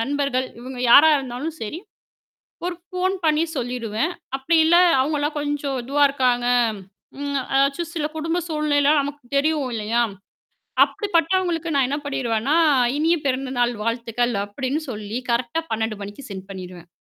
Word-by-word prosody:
நண்பர்கள் 275 0 0
இவங்க 255 0 -8
யாரா 310 +6 +9
இருந்தாலும் 270 +5 -5
சரி. 300 +11 -5 0.9
ஒரு 360 - -2
ஃபோன் 370 +1 -1
பண்ணி 310 0 +3
சொல்லிடுவேன். 245 +4 -2 0.2
அப்படி 275 +5 +1
இல்ல, 345 +2 +5 0.2
அவங்களலாம் 295 +2 -1
கொஞ்சம் 290 -2 -2
இதுவா 285 +3 +3
இருக்காங்க, 250 -3 +1 0.7
ம், 285 -1 -2
அதாச்சும் 275 +5 +1
சில 305 -2 -1
குடும்ப 325 +2 -1
சூழ்நிலை 300 -1 +2
நமக்கு 285 0 -7
தெரியும் 290 -2 +1
இல்லையா? 225 +2 0 0.8
அப்படிப்பட்டவங்களுக்கு 345 -3 0
நான் 275 -2 +3
என்ன 280 +2 -1
பண்ணிடுவேன்னா, 260 0 0 0.4
"இனிய 325 +3 +3
பிறந்தநாள் 255 -2 0
வாழ்த்துக்கள்" 235 +1 -1
அப்படின்னு 260 +8 -3
சொல்லி 215 -1 -5
கரெக்ட்டா 235 +7 0
12:00 220 -1 -1
மணிக்கு 205 +7 -8
சென்ட் 190 -1 -8
பண்ணிடுவேன். 180 -3 -9
275 Hz, 130 wpm, -22 LUFS, 240-305 Hz, 0.9 s, யாரா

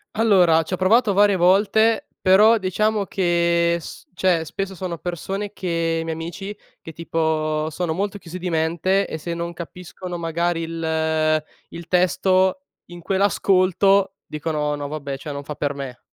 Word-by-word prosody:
Allora, 185 -7 +4
ci 175 - -7
ho - - +3
provato 210 +4 +3
varie 205 0 +4
volte, 205 +5 +3
però 210 +5 +5
diciamo 210 +2 0
che 170 -2 +1
s - - -11
cioè, 180 -4 +2
spesso 190 +4 -5
sono 180 -2 -5
persone 195 +4 -4
che 165 -3 -1
i - - -4
miei 165 0 -3
amici, 195 +5 -6 0.2
che, 165 - -10
tipo, 155 -1 -1
sono 165 0 -2
molto 200 +3 -2
chiusi 180 -1 -9
di 180 0 -3
mente 170 +4 +1
e 160 - -5
se 170 +2 -4
non 170 0 -4
capiscono 175 +1 -8
magari 170 0 -1
il 160 -1 0 0.3
il 170 0 -9
testo, 185 +5 +2 0.2
in 175 0 -11
quell'ascolto, 195 +1 +2
dicono: 150 -1 -2
"No 145 -1 -4
vabbè, 145 -2 -5
cioè 145 +1 -7
non 140 0 -6
fa 150 - -6
per 145 +1 -2
me." 135 -3 -7
175 Hz, 160 wpm, -22 LUFS, 160-190 Hz, 0.3 s, però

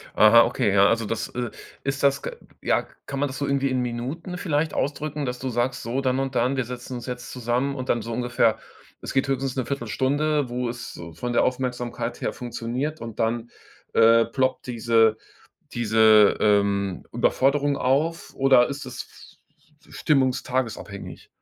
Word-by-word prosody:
Aha, 115 +2 +8
okay, 100 - 0
ja, 100 0 +6
also 115 +1 +1
das, 115 +2 -3
äh 120 -2 -4 0.3
ist 135 +1 -2
das 140 -1 +3
k - - -4 0.3
ja, - - +1 0.2
kann 140 - -5
man 145 - +1
das 130 - -7
so 140 - -1
irgendwie 140 -1 +1
in 130 -1 0
Minuten 130 +9 -4
vielleicht 155 -3 -1
ausdrücken, 145 +1 -2
dass 125 -1 -4
du 130 - -3
sagst: 120 +1 -1
„So, 120 +4 -2
dann 130 -1 +1
und 135 -1 -3
dann, 125 +3 +1
wir 130 - 0
setzen 125 +1 -7
uns 120 - -6
jetzt 125 -1 -6
zusammen 125 +3 -1
und 130 -2 -6
dann 120 - +2
so 115 +2 -6
ungefähr 115 -2 +1 0.4
es - - -6
geht 135 +1 +1
höchstens 135 -1 -1
'ne 130 -3 -1
Viertelstunde, 140 +3 0
wo 125 0 -2
es 120 +1 -7
so 85 -1 -9
von 120 +10 -4
der 120 - +3
Aufmerksamkeit 125 -2 -2
her - - -1
funktioniert“ 125 +5 -4
und 115 -2 -8
dann, 115 +1 -1 0.4
äh, 115 0 +6
ploppt 130 +2 -1
diese 115 -2 +3 0.6
diese, 110 -2 +5
ähm, 100 -2 +2
Überforderung 140 +4 +2
auf 150 +7 0
oder 135 -2 +5
ist 140 0 -6
es 120 -2 -6 0.8
f - - -25
f - - -13
stimmungs-tages-abhängig? 130 -7 -1
125 Hz, 175 wpm, -24 LUFS, 115-135 Hz, 0.8 s, Aha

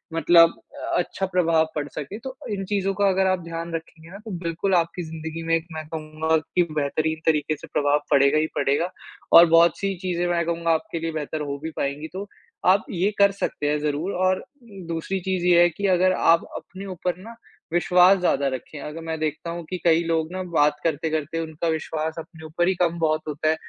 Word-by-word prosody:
मतलब 165 +1 +6 0.2
अ, - - -2
अच्छा 190 +2 -2
प्रभाव 165 -3 +2
पड़ 145 -1 -2
सके, 150 +8 -6
तो 260 +2 -7 0.2
इन 195 -1 -3
चीज़ों 195 -1 0
का 200 +1 +2
अगर 190 0 +2
आप 185 -1 +1
ध्यान 165 0 -6
रखेंगे 160 0 -9
ना 200 - -8
तो 220 - -6
बिल्कुल 170 +4 -1
आपकी 170 +1 0
ज़िंदगी 160 0 -6
में 165 - +3
एक 165 0 -3
मैं 155 -1 -6
कहूँगा 160 0 -1
कि 175 +3 0
बेहतरीन 155 +2 -1
तरीके 155 -1 +2
से - - -11
प्रभाव 145 0 +2
पड़ेगा 140 +1 +5
ही 155 - +2
पड़ेगा 155 +6 +1 0.5
और 170 - +10
बहुत 165 0 +5
सी 195 -1 -1
चीजें 175 -2 -1
मैं 170 -1 +1
कहूँगा 170 0 0
आपके 165 +1 -1
लिए 165 0 -3
बेहतर 155 0 -4
हो 140 -1 -3
भी 160 - -4
पाएँगी, 140 +3 -2
तो 190 +4 -7 0.4
आप 190 +2 +4
ये 190 +3 +1
कर 200 0 +6
सकते 150 -6 -2
हैं 150 0 +1
ज़रूर 150 +5 -1
और 185 0 +1 0.4
दूसरी 165 +4 -2
चीज़ 185 -1 -2
ये 175 -1 +6
है 175 - +6
कि 200 +4 -2
अगर 185 0 +3
आप 165 -2 +4
अपने 190 +2 -10
ऊपर 180 -1 -3
ना 230 +1 -10 0.4
विश्वास 180 +2 +5
ज़्यादा 140 -6 +1
रखें। 130 +3 -7
अगर 150 +3 -7
मैं 160 0 -3
देखता 155 +2 -3
हूँ 170 0 -5
कि 185 - -3
कई 165 0 +4
लोग 165 0 0
ना 185 - -3
बात 150 -2 +4
करते-करते 160 0 -1
उनका 160 +1 -4
विश्वास 160 0 -2
अपने 160 0 -11
ऊपर 170 +3 0
ही 190 - +1
कम 170 -1 +1
बहुत 155 -1 +1
होता 150 +1 -1
है, 160 - +3
165 Hz, 210 wpm, -24 LUFS, 155-180 Hz, 0.5 s, और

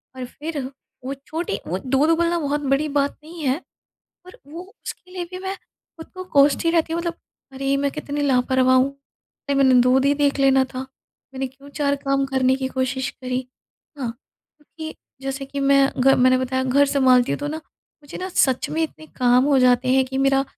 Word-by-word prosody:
और 255 - -5
फिर 300 +4 -6 0.5
वो 270 - -3
छोटी 320 - -3
वो 180 +3 -2
दूध 275 +4 +2
उबलना 340 +1 +2
बहुत 295 -1 -1
बड़ी 275 +2 +1
बात 280 0 -1
नहीं 330 +2 -10
है, 270 +4 +1 0.7
पर 365 - -14
वो 330 +5 -8 0.2
उसके 365 - -8
लिए 360 -2 -4
भी 365 - -6
मैं 380 +1 -4
ख़ुद 325 -1 -17
को 370 0 -7
कोसती 285 +3 +4
रहती 330 -1 +1
हूँ 335 - -1
मतलब 340 0 -3 0.4
अरे! 275 +1 -1
मैं 280 0 0
कितनी 295 0 -5
लापरवाह 260 -1 +3
हूँ, 275 +2 +2 0.6
मैंने 265 -2 +5
दूध 255 +2 +3
ही 280 +1 +3
देख 285 -1 +1
लेना 270 -1 +4
था, 260 0 -7 0.5
मैंने 265 0 -2
क्यों 270 +2 -15
4 285 -1 0
काम 275 0 +1
करने 265 -1 +2
की 265 -1 -3
कोशिश 260 0 -2
करी 255 -1 -4
है 260 +2 -16
ना? - - -1 0.5
क्योंकि 315 +1 -9 0.3
जैसे 270 0 -4
कि 280 +1 -5
मैं 275 0 +4
घ 270 +2 +6
मैंने 255 0 +4
बताया 260 0 -1
घर 280 +2 +3
सँभालती 260 -2 +3
हूँ - - -2
तो 290 0 -4
ना, 310 - -3 0.5
मुझे 290 - -9
ना 370 - -4
सच 260 -8 +1
में 320 +1 -1
इतने 315 0 -5
काम 250 0 +4
हो 280 -1 +3
जाते 250 0 +3
हैं 265 0 +4
कि 265 +1 -4
मेरा 270 0 +3
275 Hz, 200 wpm, -22 LUFS, 260-300 Hz, 0.7 s, घ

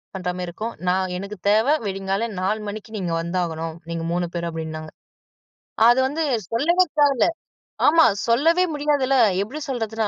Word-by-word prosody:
பண்ற 185 -1 -3
மாரி 180 -1 -4
இருக்கும். 215 +7 -5
நான் 185 +1 +1
எனக்கு 200 +3 -6
தேவ 215 +2 +4 0.2
விடியற்காலை 195 +3 -2
4 200 +4 0
மணிக்கு 215 +2 -7
நீ 215 - -3
இங்க 170 -1 -1
வந்தாகணும், 165 -2 -3
நீங்க 165 0 -3
3 175 +1 0
பேரும் 170 -1 -3
அப்டின்னாங்க. 160 -1 -6 1.0
அது 240 +2 +5
வந்து 310 +4 -2 0.3
சொல்லவே 340 +10 +3 0.2
தேவயில்ல. 285 0 +4 0.6
ஆமா, 325 +2 +6 0.2
சொல்லவே 320 +10 +3
முடியாதுல. 290 -2 +1 0.3
எப்டி 225 +10 -5
சொல்றதுன்னா, 225 -4 -2
210 Hz, 150 wpm, -22 LUFS, 180-265 Hz, 1.0 s, ஆமா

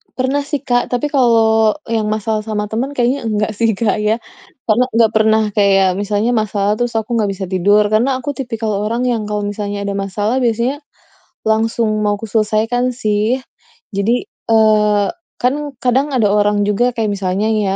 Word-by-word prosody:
Pernah 260 +2 0
sih, 290 -1 -3
Kak. 245 -2 +1
Tapi 250 +4 -2
kalau 225 -4 +3 0.2
yang 220 -2 0
masalah 215 0 -1
sama 210 -1 -2
teman 260 +6 -2
kayaknya 245 0 0
enggak 210 0 0
sih, 225 -2 +1
Kak, 215 +1 0
ya. 210 +1 +1 0.5
Karena 235 +3 +2
ga 230 -1 +5
pernah 220 0 +3
kayak 195 -2 +3
misalnya 205 +3 0
masalah 210 -1 0
terus 240 -1 -2
aku 225 +1 -1
ga 210 - +1
bisa 195 -1 -4
tidur, 205 +3 +3
karena 245 +5 +2
aku 260 +3 -4
tipikal 230 -4 -3 0.2
orang 235 +3 -1
yang 230 -4 -1
kalau 210 0 -2
misalnya 205 0 -4
ada 200 - -2
masalah 205 +5 -1
biasanya 245 +3 0 0.7
langsung 220 0 +1
mau 205 -1 +1
aku 225 - -7
selesaikan, 225 +3 0
sih. 215 0 0 0.6
Jadi, 220 +5 0 0.2
eee, 210 -2 +3 0.3
kan 250 +2 +2 0.3
kadang 255 +3 +2
ada 225 -4 +3
orang 205 0 +2
juga 235 +5 +1
kayak 220 -3 -1
misalnya 195 +2 -1
nih 205 -3 0
220 Hz, 170 wpm, -17 LUFS, 210-240 Hz, 0.7 s, ga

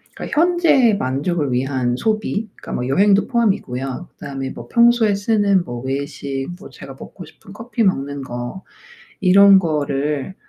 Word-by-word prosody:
그러니까 300 - -3
현재의 335 - +3
만족을 140 +2 -2
위한 125 -1 -1
소비 215 - -2
그러니까 - - -9
뭐 125 - -3
여행도 200 +8 +3
포함이고요. 180 - -2
그다음에 135 -1 -6
뭐 - - -10
'평소에 235 -3 +4
쓰는 200 -3 +1
뭐 120 -1 -6
외식 135 0 -4
뭐 205 - -12
제가 - - -11
먹고 - - -11
싶은 - - -17
커피 230 0 -3
먹는 140 -7 -1
거 120 +8 -7 0.6
이런 195 +1 +7
거를 150 -1 -2
175 Hz, 320 characters per minute, -19 LUFS, 135-210 Hz, 0.6 s, 이런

